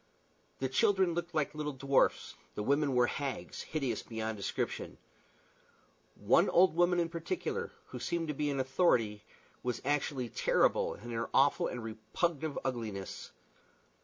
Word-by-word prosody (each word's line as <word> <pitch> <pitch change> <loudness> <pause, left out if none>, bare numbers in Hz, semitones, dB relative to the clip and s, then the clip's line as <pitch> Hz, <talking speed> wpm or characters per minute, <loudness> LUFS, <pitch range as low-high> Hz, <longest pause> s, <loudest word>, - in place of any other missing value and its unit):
The 130 - -1
children 185 +7 +3
looked 175 0 -4
like 150 -2 +1
little 150 -1 -3
dwarfs; 135 +1 +2 0.2
the 105 - -2
women 140 +2 +2
were 125 0 +5
hags, 130 -9 -4
hideous 135 -8 -2
beyond 110 -1 -4
description. 100 -1 -3 1.2
One - - +4
old 185 -2 +5
woman 175 +1 +3
in 170 - +2
particular, 370 - -3 0.2
who - - -6
seemed 170 -1 -2
to - - 0
be 150 +1 -1
in 140 -1 -1
authority, 125 - +2 0.4
was 125 -1 -2
actually 140 -3 0
terrible - - +2
in 120 +3 -9
her 115 0 -2
awful 140 +6 +4
and 120 -2 -5
repulsive 140 - -2
ugliness. 110 -7 -4
140 Hz, 140 wpm, -32 LUFS, 115-165 Hz, 1.2 s, were